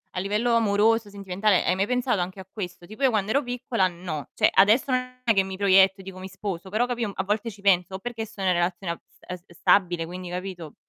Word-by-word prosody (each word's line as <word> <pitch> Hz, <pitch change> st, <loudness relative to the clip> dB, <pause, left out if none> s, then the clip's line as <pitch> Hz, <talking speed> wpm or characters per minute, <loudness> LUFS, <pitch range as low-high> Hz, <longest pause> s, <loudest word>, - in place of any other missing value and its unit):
a 180 Hz, -, -1 dB
livello 210 Hz, +5 st, 0 dB
amoroso, 220 Hz, 0 st, +3 dB
sentimentale 195 Hz, 0 st, 0 dB
hai 180 Hz, -, +2 dB
mai 195 Hz, +2 st, 0 dB
pensato 250 Hz, -5 st, 0 dB
anche 185 Hz, +2 st, -5 dB
a 190 Hz, -, -10 dB
questo? 180 Hz, -4 st, -7 dB
Tipo 215 Hz, +8 st, -12 dB
io 265 Hz, -, +6 dB
quando 215 Hz, -2 st, 0 dB
ero 280 Hz, -, +3 dB
piccola 245 Hz, -5 st, 0 dB
no, 170 Hz, -4 st, -6 dB
cioè -, -, +4 dB
adesso 225 Hz, +8 st, +4 dB
non 255 Hz, 0 st, -2 dB
è 230 Hz, -, +3 dB
che 195 Hz, -2 st, +3 dB
mi 190 Hz, 0 st, -6 dB
proietto 195 Hz, -1 st, +4 dB
e -, -, -14 dB
dico: 185 Hz, -1 st, -9 dB
"Mi 185 Hz, -, -7 dB
sposo", 190 Hz, -1 st, -6 dB
però 220 Hz, +5 st, +1 dB
capì 245 Hz, -1 st, -3 dB
un 205 Hz, -, -2 dB
a 190 Hz, -, -1 dB
volte 210 Hz, +3 st, -1 dB
ci 200 Hz, -, -15 dB
penso 190 Hz, -1 st, +2 dB
o -, -, -5 dB
perché 230 Hz, +1 st, -5 dB
sono 205 Hz, -3 st, -5 dB
in 180 Hz, -, +4 dB
relazione 175 Hz, +1 st, -1 dB
ab -, -, -12 dB, 0.3 s
ehm, 180 Hz, 0 st, -5 dB
s 175 Hz, -, -27 dB
stabile 175 Hz, -2 st, +2 dB
quindi 180 Hz, +1 st, -7 dB
capito? 180 Hz, -4 st, -6 dB
195 Hz, 250 wpm, -25 LUFS, 185-225 Hz, 0.3 s, io